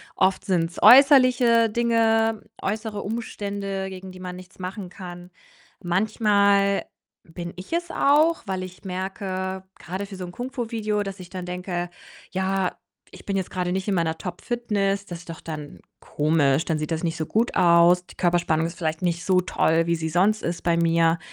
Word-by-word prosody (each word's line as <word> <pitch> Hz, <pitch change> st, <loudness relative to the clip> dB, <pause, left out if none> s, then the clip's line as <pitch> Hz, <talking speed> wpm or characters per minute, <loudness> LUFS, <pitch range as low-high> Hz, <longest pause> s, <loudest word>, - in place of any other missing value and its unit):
oft 190 Hz, 0 st, +2 dB
sind's 175 Hz, -3 st, 0 dB
äußerliche 255 Hz, -4 st, +7 dB
Dinge, 225 Hz, -1 st, +2 dB, 0.2 s
äußere 215 Hz, 0 st, -3 dB
Umstände, 200 Hz, -3 st, -4 dB
gegen 190 Hz, 0 st, -9 dB
die 185 Hz, -, -12 dB
man 180 Hz, -1 st, -6 dB
nichts 185 Hz, +1 st, -14 dB
machen 185 Hz, +1 st, -6 dB
kann. 175 Hz, -1 st, -10 dB, 0.5 s
Manchmal 200 Hz, +1 st, +2 dB, 0.4 s
bin 170 Hz, +1 st, -8 dB
ich 185 Hz, -, -8 dB
es 345 Hz, 0 st, -1 dB
auch, 310 Hz, +4 st, +3 dB
weil 190 Hz, -1 st, -2 dB
ich 185 Hz, +1 st, -11 dB
merke 190 Hz, 0 st, -4 dB, 0.2 s
grade 190 Hz, +4 st, -5 dB
für 195 Hz, -, -9 dB
so 185 Hz, -, -6 dB
'n 175 Hz, -, -8 dB
Kung 245 Hz, +7 st, -6 dB
Fu-Video, 220 Hz, -5 st, -2 dB
dass 195 Hz, -1 st, -7 dB
ich 180 Hz, -1 st, -10 dB
dann 185 Hz, -1 st, -6 dB
denke: 180 Hz, -1 st, -4 dB, 0.4 s
„Ja, 190 Hz, 0 st, -1 dB, 0.4 s
ich -, -, -14 dB
bin 195 Hz, -1 st, -1 dB
jetzt 190 Hz, -, -3 dB
grade 180 Hz, -1 st, -2 dB
nicht 190 Hz, +2 st, -2 dB
in 200 Hz, -, +1 dB
meiner 165 Hz, -2 st, 0 dB
Top-Fitness. 200 Hz, +1 st, -2 dB
Das 175 Hz, -3 st, -7 dB
ist 175 Hz, -, -15 dB
doch 165 Hz, -, -7 dB
dann 150 Hz, -3 st, -7 dB, 0.2 s
komisch, 150 Hz, -1 st, +1 dB
dann 160 Hz, -2 st, -1 dB
sieht 155 Hz, +2 st, -4 dB
das 160 Hz, +1 st, -2 dB
nicht 165 Hz, -1 st, -1 dB
so 155 Hz, -, -2 dB
gut 230 Hz, +3 st, 0 dB
aus. 175 Hz, 0 st, +5 dB
Die -, -, -15 dB
Körperspannung 170 Hz, -2 st, +1 dB
ist 170 Hz, -, -9 dB
vielleicht 160 Hz, -2 st, -2 dB
nicht 175 Hz, -1 st, 0 dB
so 185 Hz, -1 st, +3 dB
toll, 165 Hz, -2 st, +1 dB
wie 170 Hz, -, +2 dB
sie 160 Hz, -1 st, -3 dB
sonst 200 Hz, +6 st, +2 dB
ist 170 Hz, +1 st, -3 dB
bei 170 Hz, -1 st, +2 dB
mir." 165 Hz, 0 st, +3 dB
185 Hz, 180 wpm, -24 LUFS, 175-210 Hz, 0.5 s, äußerliche